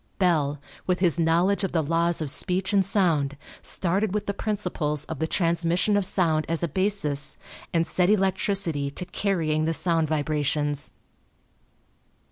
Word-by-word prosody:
Bell, 150 Hz, -7 st, +1 dB, 0.3 s
with 180 Hz, -1 st, +1 dB
his 175 Hz, -2 st, +2 dB
knowledge 170 Hz, +5 st, +2 dB
of 195 Hz, -, -2 dB
the 165 Hz, -2 st, +2 dB
laws 170 Hz, +2 st, +1 dB
of 150 Hz, -3 st, -1 dB
speech 185 Hz, +4 st, -1 dB
and 195 Hz, -1 st, +4 dB
sound, 165 Hz, -8 st, +1 dB, 0.2 s
started 195 Hz, +3 st, -1 dB
with 210 Hz, -, -1 dB
the 200 Hz, -, -2 dB
principles 180 Hz, -9 st, -2 dB
of 160 Hz, -4 st, -6 dB
the 160 Hz, -, 0 dB
transmission 170 Hz, +4 st, +1 dB
of 200 Hz, -2 st, +1 dB
sound 160 Hz, -6 st, +1 dB
as 165 Hz, +1 st, -1 dB
a -, -, +2 dB
basis 165 Hz, -4 st, +1 dB, 0.3 s
and 165 Hz, -1 st, +2 dB
set 180 Hz, +3 st, +1 dB
electricity 190 Hz, -7 st, +1 dB
to 180 Hz, +6 st, -7 dB
carrying 165 Hz, -5 st, 0 dB
the 165 Hz, 0 st, 0 dB
sound 165 Hz, -2 st, +1 dB
vibrations. 145 Hz, -1 st, -1 dB
170 Hz, 150 wpm, -25 LUFS, 155-190 Hz, 0.3 s, and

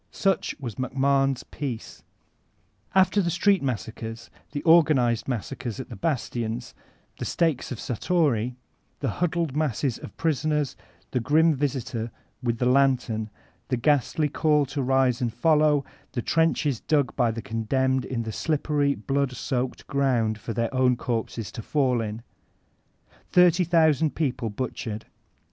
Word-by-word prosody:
Such 195 Hz, -4 st, 0 dB
was 120 Hz, -6 st, -6 dB
MacMahon's 135 Hz, 0 st, +1 dB
oeace* 130 Hz, -6 st, -6 dB, 0.9 s
After 190 Hz, +2 st, +4 dB
the 175 Hz, -, 0 dB
street 190 Hz, +3 st, +3 dB
massacres, 115 Hz, -2 st, -5 dB, 0.2 s
the 145 Hz, -1 st, -4 dB
organized 150 Hz, -9 st, +4 dB
massacres 125 Hz, 0 st, -4 dB
at 130 Hz, -, -6 dB
the 115 Hz, -, -7 dB
bastions, 120 Hz, -, -2 dB, 0.5 s
the -, -, -3 dB
stakes 160 Hz, -8 st, 0 dB
of 125 Hz, -, -3 dB
Satory, 125 Hz, -3 st, 0 dB, 0.5 s
the 135 Hz, -, 0 dB
huddled 170 Hz, -4 st, 0 dB
masses 140 Hz, -4 st, 0 dB
of -, -, -10 dB
prisoners, 150 Hz, -2 st, 0 dB, 0.4 s
the 125 Hz, -, +1 dB
grim 155 Hz, +6 st, +4 dB
visitor 130 Hz, -4 st, -2 dB, 0.3 s
with 120 Hz, -2 st, -1 dB
the 125 Hz, -, 0 dB
lantern, 125 Hz, -4 st, +2 dB, 0.4 s
the 130 Hz, -, 0 dB
ghastly 150 Hz, +4 st, +2 dB
call 150 Hz, 0 st, +2 dB
to 140 Hz, +2 st, -3 dB
rise 130 Hz, -1 st, +2 dB
and 120 Hz, -2 st, 0 dB
follow, 150 Hz, +3 st, +3 dB, 0.3 s
the 120 Hz, -, -2 dB
trenches 160 Hz, -6 st, +1 dB
dug 145 Hz, -5 st, +1 dB
by 120 Hz, -3 st, +2 dB
the 115 Hz, -1 st, -4 dB
condemned 130 Hz, +4 st, 0 dB
in 115 Hz, -3 st, -3 dB
the 110 Hz, -, -4 dB
slippery, 145 Hz, -1 st, 0 dB
blood 140 Hz, -2 st, -1 dB
soaked 125 Hz, 0 st, -3 dB
ground 120 Hz, -6 st, +1 dB
for 115 Hz, -, -5 dB
their 115 Hz, +2 st, -1 dB
own 130 Hz, -1 st, +3 dB
corpses 115 Hz, -2 st, -3 dB
to 115 Hz, -, -6 dB
fall 130 Hz, -1 st, +1 dB
in. 110 Hz, +1 st, -5 dB, 1.1 s
Thirty 180 Hz, 0 st, +5 dB
thousand 160 Hz, -3 st, +3 dB
people 125 Hz, -7 st, -1 dB
butchered! 110 Hz, -1 st, -4 dB
130 Hz, 140 wpm, -26 LUFS, 120-150 Hz, 1.1 s, Thirty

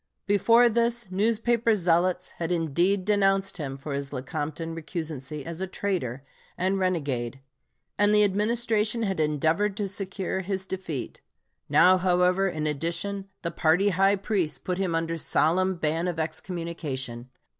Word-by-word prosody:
Before 230 Hz, +4 st, +5 dB
this, 235 Hz, -2 st, 0 dB
newspaper 230 Hz, +3 st, +2 dB
zealots 180 Hz, 0 st, +1 dB
had 165 Hz, 0 st, -2 dB
indeed 175 Hz, +4 st, +1 dB
denounced 195 Hz, -2 st, +2 dB
him 135 Hz, -4 st, -5 dB
for 140 Hz, +1 st, -6 dB
his 140 Hz, 0 st, -3 dB
Lecompton 150 Hz, +4 st, -4 dB
recusancy 155 Hz, -3 st, -5 dB
as 165 Hz, +1 st, -6 dB
a 190 Hz, -, -1 dB
traitor 175 Hz, -10 st, -3 dB, 0.3 s
and 190 Hz, +2 st, 0 dB
renegade, 140 Hz, -9 st, -1 dB, 0.6 s
and 205 Hz, 0 st, +4 dB
the 210 Hz, 0 st, +5 dB
Administration 215 Hz, +2 st, +1 dB
had 195 Hz, -5 st, -1 dB
endeavored 160 Hz, +7 st, +1 dB
to 205 Hz, -2 st, -1 dB
secure 190 Hz, 0 st, -3 dB
his 190 Hz, 0 st, -3 dB
defeat; 185 Hz, -8 st, -5 dB, 0.5 s
now, 185 Hz, +1 st, +6 dB
however, 180 Hz, +1 st, +3 dB
in 155 Hz, -4 st, -3 dB
addition, 170 Hz, +7 st, -2 dB
the 170 Hz, -, -2 dB
party 175 Hz, +5 st, +3 dB
high 195 Hz, +2 st, +3 dB
priests 190 Hz, -7 st, -1 dB
put 180 Hz, +6 st, -3 dB
him 185 Hz, -4 st, 0 dB
under 165 Hz, 0 st, -1 dB
solemn 185 Hz, +4 st, +2 dB
ban 165 Hz, +1 st, -1 dB
of 175 Hz, -2 st, -2 dB
excommunication. 155 Hz, -8 st, -4 dB
180 Hz, 140 wpm, -26 LUFS, 160-200 Hz, 0.6 s, now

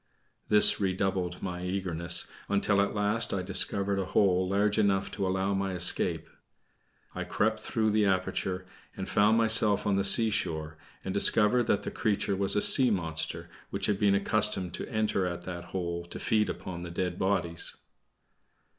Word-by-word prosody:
This 105 Hz, 0 st, +6 dB
redoubled 95 Hz, -2 st, -2 dB
my 90 Hz, -1 st, -5 dB
eagerness, 90 Hz, -2 st, 0 dB, 0.2 s
until 100 Hz, 0 st, +1 dB
at 100 Hz, -, -2 dB
last 105 Hz, +1 st, -1 dB
I 95 Hz, -, -3 dB
discovered 100 Hz, +1 st, +3 dB
a 95 Hz, -, -2 dB
hole 95 Hz, -1 st, +1 dB
large 105 Hz, +2 st, 0 dB
enough 100 Hz, -2 st, 0 dB
to 95 Hz, -, -3 dB
allow 95 Hz, +1 st, -1 dB
my 95 Hz, -1 st, -3 dB
escape. 90 Hz, 0 st, 0 dB, 0.9 s
I -, -, -5 dB
crept -, -, -2 dB
through 110 Hz, -1 st, -2 dB
the 105 Hz, 0 st, +1 dB
aperture, 95 Hz, -1 st, -2 dB, 0.3 s
and -, -, -6 dB
found 105 Hz, +2 st, +2 dB
myself 110 Hz, -2 st, +3 dB
on 100 Hz, -1 st, 0 dB
the 100 Hz, -, 0 dB
seashore, 95 Hz, -8 st, +1 dB, 0.3 s
and -, -, -4 dB
discovered 115 Hz, +2 st, +4 dB
that 100 Hz, 0 st, 0 dB
the -, -, -5 dB
creature 100 Hz, -2 st, -2 dB
was 100 Hz, +1 st, 0 dB
a 105 Hz, -, +1 dB
sea 130 Hz, -3 st, +7 dB
monster 80 Hz, -5 st, -3 dB, 0.2 s
which -, -, -3 dB
had 100 Hz, -2 st, -1 dB
been 100 Hz, -1 st, +2 dB
accustomed 100 Hz, -2 st, 0 dB
to -, -, -7 dB
enter 110 Hz, -4 st, -1 dB
at 90 Hz, -1 st, -6 dB
that 85 Hz, -1 st, -8 dB
hole 85 Hz, -1 st, -5 dB
to 85 Hz, -, -10 dB
feed 105 Hz, -1 st, -1 dB
upon 85 Hz, -2 st, -7 dB
the 85 Hz, -, -8 dB
dead 90 Hz, +1 st, -4 dB
bodies. 95 Hz, -3 st, -2 dB
95 Hz, 165 wpm, -27 LUFS, 90-105 Hz, 0.9 s, sea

